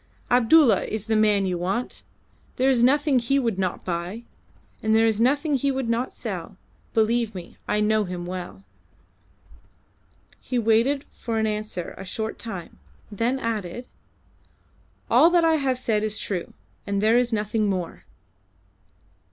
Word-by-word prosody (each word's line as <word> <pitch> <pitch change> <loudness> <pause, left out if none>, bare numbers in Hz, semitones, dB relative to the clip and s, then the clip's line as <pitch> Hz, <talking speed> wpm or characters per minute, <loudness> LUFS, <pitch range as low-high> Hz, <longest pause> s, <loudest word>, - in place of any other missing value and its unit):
"Abdulla 250 +2 +5
is 220 -1 -4
the 220 0 0
man 210 -2 +3
you 180 -2 -2
want. 195 +8 -3 0.5
There 265 +1 +3
is 245 -3 +2
nothing 280 +2 +4
he 245 +4 +1
would 230 -7 0
not 185 -2 -2
buy, 180 +6 -4 0.6
and 220 0 +2
there 225 0 +5
is 220 -1 +1
nothing 285 +5 +2
he 275 +1 +1
would 265 -2 -2
not 235 +2 0
sell; - - -6 0.4
believe 225 -1 +1
me, 175 -2 -9
I 210 - +1
know 215 0 +2
him 180 -1 -5
well." 175 - -7 1.8
He 255 - -3
waited 235 +5 +2
for 230 -2 -4
an 220 - +1
answer 210 -4 -3
a - - -6
short 220 +3 -4
time, 190 -7 -8 0.3
then 230 +5 0
added 230 -2 -4 1.2
"All 330 - +6
that 345 -1 +3
I 320 -1 +4
have 265 -3 0
said 220 -4 0
is 215 0 -2
true, 185 -4 -3 0.4
and 200 0 0
there 220 +4 +4
is 245 -1 0
nothing 215 0 0
more." 185 -3 -4
220 Hz, 150 wpm, -24 LUFS, 200-250 Hz, 1.8 s, All